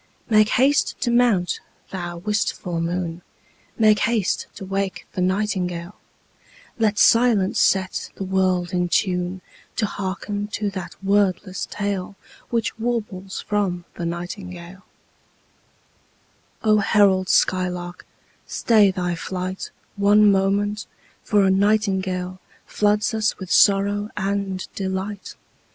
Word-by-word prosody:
Make 215 0 +5
haste 275 +3 +2
to 240 - +1
mount, 235 -7 +2 0.3
thou 175 -2 -5
wistful 180 -3 -2
moon, 170 0 -3 0.6
Make 215 -2 +5
haste 230 -5 0
to 195 - -8
wake 195 0 -3
the 185 - -2
nightingale: 180 -2 -1 0.9
Let 215 -2 +2
silence 230 -6 +4
set 190 -1 +1
the - - -5
world 185 -2 0
in 180 -1 0
tune 180 -1 0 0.3
To 220 - +1
hearken 200 +1 -4
to 205 -2 -1
that 185 -2 -7
wordless 195 -1 +1
tale 200 -1 -3 0.3
Which 230 0 -1
warbles 210 -5 -3
from 190 -4 -1
the 170 - -4
nightingale 175 +1 -7 1.8
O 215 -1 +4
herald 195 -2 +3
skylark, 180 -1 0 0.4
stay 215 -4 +4
thy 180 -2 -2
flight 185 +2 -4 0.3
One 205 +1 +5
moment, 200 +2 0 0.4
for 205 -2 +3
a 190 - +4
nightingale 190 -2 0 0.3
Floods 210 +3 +1
us 220 -1 0
with 190 -2 -8
sorrow 205 +1 +4
and 195 -1 -2
delight. 190 +1 -4
195 Hz, 110 wpm, -22 LUFS, 185-210 Hz, 1.8 s, Make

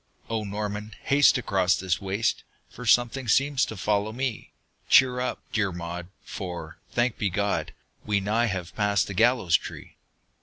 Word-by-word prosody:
"O 110 -1 -1
Norman, 105 +1 -4
haste 140 -1 +5
across 95 -7 +2
this 90 -2 -1
waste 100 +3 -1 0.3
For 125 0 -8
something 120 +3 +3
seems 135 +3 +3
to 110 - -7
follow 105 +3 0
me!" 125 -1 -4 0.4
"Cheer 125 -1 +5
up, 125 - -3
dear 105 -4 +1
Maud, 85 0 -6 0.2
for, 85 -4 -7
thanked 120 -1 0
be 100 - +1
God, 100 +2 -1 0.3
We 105 -1 +1
nigh 110 +4 +1
have 95 -4 -4
passed 105 -1 +2
the 95 - -6
gallows 115 -4 +3
tree!" - - -4
105 Hz, 155 wpm, -26 LUFS, 95-120 Hz, 0.4 s, haste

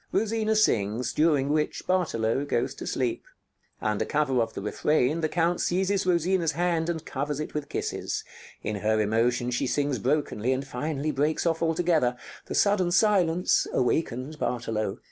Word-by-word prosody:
Rosina 220 +1 +1
sings, 115 - +1
during 150 -3 +2
which 150 0 -1
Bartolo 140 -9 +1
goes 130 -2 -1
to - - -8
sleep. 125 -3 -1 0.6
Under 105 -1 0
cover 140 -5 +1
of 115 - -3
the - - -4
refrain 150 +7 +1
the 155 - 0
Count 170 +1 +1
seizes 190 +2 0
Rosina's 175 -1 +2
hand 170 -1 0
and 160 -2 -3
covers 145 +1 -3
it 155 - -5
with 150 -1 -4
kisses. - - -3 0.4
In 105 0 -2
her 110 +2 +1
emotion 120 +3 +1
she 120 - 0
sings 140 -2 0
brokenly, 130 -2 0
and 135 +1 -3
finally 145 +3 -2
breaks 150 +4 0
off 165 -1 +1
altogether. 160 -6 +1 0.3
The - - -4
sudden 200 -3 +3
silence 180 -3 +3
awakens 130 +2 -1
Bartolo. 110 -6 -2
150 Hz, 155 wpm, -27 LUFS, 125-170 Hz, 0.6 s, sudden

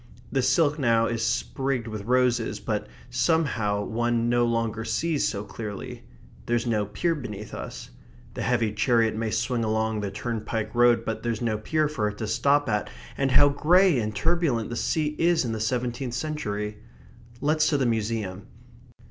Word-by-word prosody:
The 135 - +1
silk 145 +4 +2
now 115 -3 +3
is 115 -1 -2
sprigged 130 +1 -1
with 110 -2 -6
roses, 120 -3 +1
but 105 0 -2 0.2
somehow 120 -7 +1
one 120 0 0
no 120 0 +3
longer 115 -1 -1
sees 160 +5 0
so 100 -1 -3
clearly. 105 -1 -7 0.4
There's 120 0 +1
no 105 -3 0
pier 170 - 0
beneath 110 -8 -7
us. - - -7 0.4
The - - -5
heavy 120 -3 +1
chariot 115 0 +2
may 110 0 -1
swing 120 +2 0
along 110 0 0
the 100 - -2
turnpike 110 +1 -3
road, 120 -1 +4
but 110 - -3
there's 120 0 -2
no 110 -2 0
pier 155 +7 +1
for 115 -8 -1
it 105 0 -5
to 110 - -3
stop 145 +6 +2
at, 105 -2 -1 0.3
and 135 -1 +1
how 145 +2 +6
grey 170 +2 +4
and 110 -1 -3
turbulent 150 -5 +1
the - - -3
sea 150 +3 0
is 170 -3 +3
in 115 - -2
the 110 - -3
seventeenth 120 +2 -2
century! 105 -8 -3 0.6
Let's 155 +2 +2
to 145 - +2
the 135 - +1
museum. 110 -4 -2
120 Hz, 170 wpm, -26 LUFS, 110-135 Hz, 0.6 s, how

